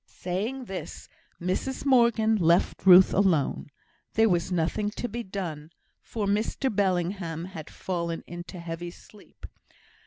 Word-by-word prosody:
Saying 215 Hz, +9 st, -4 dB
this, 190 Hz, -4 st, -7 dB, 0.3 s
Mrs 185 Hz, +11 st, -2 dB
Morgan 235 Hz, -4 st, +4 dB
left 175 Hz, 0 st, +2 dB
Ruth 185 Hz, 0 st, +8 dB
alone. 180 Hz, -7 st, +1 dB, 0.5 s
There 225 Hz, 0 st, +4 dB
was 175 Hz, 0 st, 0 dB
nothing 180 Hz, +4 st, 0 dB
to 235 Hz, +3 st, -4 dB
be 240 Hz, +1 st, -5 dB
done, 175 Hz, -7 st, -6 dB, 0.3 s
for 220 Hz, -4 st, -4 dB
Mr 215 Hz, +4 st, 0 dB
Bellingham 175 Hz, -3 st, -1 dB
had 165 Hz, -5 st, -9 dB
again -, -, -14 dB
fallen 170 Hz, -2 st, -3 dB
into 175 Hz, +2 st, -8 dB
a -, -, -8 dB
heavy 170 Hz, +1 st, -5 dB
sleep. 205 Hz, +4 st, -16 dB
185 Hz, 135 wpm, -27 LUFS, 170-215 Hz, 0.5 s, Ruth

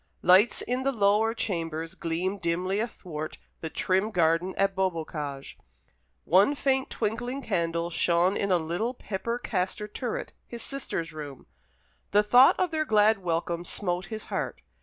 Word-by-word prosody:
Lights 190 Hz, +6 st, +5 dB
in 250 Hz, +1 st, -1 dB
the 275 Hz, +1 st, +1 dB
lower 220 Hz, 0 st, +2 dB
chambers 165 Hz, -6 st, -3 dB
gleamed 180 Hz, +4 st, -2 dB
dimly 180 Hz, +4 st, 0 dB
athwart 170 Hz, -9 st, -5 dB, 0.2 s
the 160 Hz, -, -5 dB
trim 190 Hz, +5 st, +1 dB
garden 170 Hz, -1 st, +1 dB
at 195 Hz, 0 st, +2 dB
Beaubocage. 155 Hz, -7 st, -3 dB, 0.6 s
One 195 Hz, -, +4 dB
faint 265 Hz, -1 st, +1 dB
twinkling 240 Hz, +5 st, -3 dB
candle 170 Hz, -4 st, -1 dB
shone 175 Hz, +3 st, +2 dB
in 200 Hz, -, -1 dB
a 180 Hz, -, +5 dB
little 175 Hz, +10 st, -2 dB
pepper 230 Hz, +2 st, -3 dB
castor 210 Hz, -2 st, -2 dB
turret, 235 Hz, +3 st, -4 dB
his 235 Hz, -1 st, -7 dB
sister's 170 Hz, -, -3 dB
room. 145 Hz, -4 st, -8 dB, 0.7 s
The 210 Hz, +1 st, +5 dB
thought 245 Hz, +5 st, +6 dB
of 365 Hz, -2 st, +1 dB
their 310 Hz, -1 st, +1 dB
glad 215 Hz, -5 st, +4 dB
welcome 170 Hz, -1 st, -2 dB
smote 180 Hz, 0 st, -2 dB
his 220 Hz, +2 st, -6 dB
heart. -, -, -3 dB
190 Hz, 145 wpm, -27 LUFS, 170-225 Hz, 0.7 s, thought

